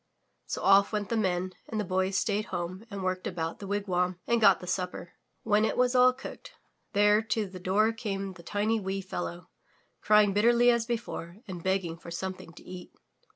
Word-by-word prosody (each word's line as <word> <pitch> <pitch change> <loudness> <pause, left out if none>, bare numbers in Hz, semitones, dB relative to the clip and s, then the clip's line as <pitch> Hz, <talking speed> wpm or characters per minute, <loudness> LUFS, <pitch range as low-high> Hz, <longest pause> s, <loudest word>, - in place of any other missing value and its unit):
So - - -4
off 195 +1 +5
went 210 -2 -2
the 230 - 0
Men, 185 -3 0 0.2
and 220 - -2
the - - 0
Boy 185 +1 0
stayed 205 +2 0
home 180 +3 -5
and 200 -2 -6
worked 185 0 -2
about 165 -2 -4
the 200 - -7
wigwam 185 -3 -1
and 235 -1 +1
got 210 - +6
the - - -9
supper. 180 -1 -3 0.3
When 210 -1 +3
it 220 - 0
was 250 0 +3
all 250 0 +6
cooked, 260 +1 -10 0.4
there 210 +1 +5
to 220 -1 -1
the 185 -1 -9
door 205 +5 +2
came 195 -4 -4
the 180 - -13
tiny 210 +5 0
wee 195 0 -3
fellow, 85 - -6 0.5
crying 210 -2 +5
bitterly 235 +4 +5
as 235 -1 0
before 220 -7 -4
and 180 -3 -6
begging 190 -3 -1
for 170 - -10
something 185 -1 -5
to - - -14
eat. 180 -1 -10
195 Hz, 195 wpm, -29 LUFS, 185-215 Hz, 0.5 s, got